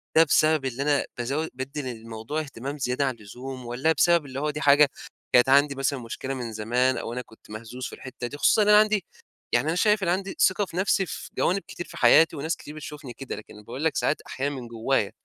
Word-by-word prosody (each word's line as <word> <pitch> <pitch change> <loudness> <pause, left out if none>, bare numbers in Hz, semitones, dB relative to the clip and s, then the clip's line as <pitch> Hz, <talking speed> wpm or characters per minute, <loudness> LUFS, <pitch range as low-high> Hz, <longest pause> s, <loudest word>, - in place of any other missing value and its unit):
ده 160 - +8
بسبب 155 -2 +3
اللي 130 +2 -2
أنا 145 -1 +2
بازو 140 +7 -1
بادّي 135 +3 -5
للموضوع 115 +3 -5
اهتمام 140 -1 -6
زيادة 130 +1 0
عن 130 -2 -1
اللزوم، 125 +4 -9
والّا 130 +7 +1
بسبب 170 -2 +3
اللي 135 0 -6
هو 150 +1 -1
دي 150 +1 -4
حاجة 145 0 +6 0.4
كانت 125 +1 +6
عندي 140 +1 +5
مثلًا 135 0 -1
مشكلة 130 +3 -5
من 120 -4 -5
زمان، 120 +4 +1
أو 115 - -4
أنا 125 - -3
كنت 110 -3 -19
مهزوز 115 +4 -7
في - - -6
الحتّة 130 -2 -7
دي، 145 - -8
خصوصًا 215 - +4
إن - - -1
أنا 210 0 +8
عندي 215 -4 +2 0.5
يعني 125 +6 +2
أنا 165 - +1
شايف 210 +1 +3
إن - - 0
أنا 175 +2 +3
عندي 195 0 -6
ثقة 195 +2 +3
في 175 - -9
نفسي 190 0 +2
في - - -7
جوانب 195 +2 +1
كتير 175 - -7
في - - -11
حياتي 165 0 +6
وناس 160 +4 -2
كتير 150 - -11
بتشوفني 150 -4 -8
كده، 135 +2 -6
لكن 110 - -11
أنا 105 - -13
باقول 130 +7 -6
لك 160 - +1
ساعات، 155 - 0
أحيانًا 140 +2 -3
من 125 -2 -7
جوّايا. 115 -2 0
135 Hz, 235 wpm, -26 LUFS, 125-155 Hz, 0.5 s, ده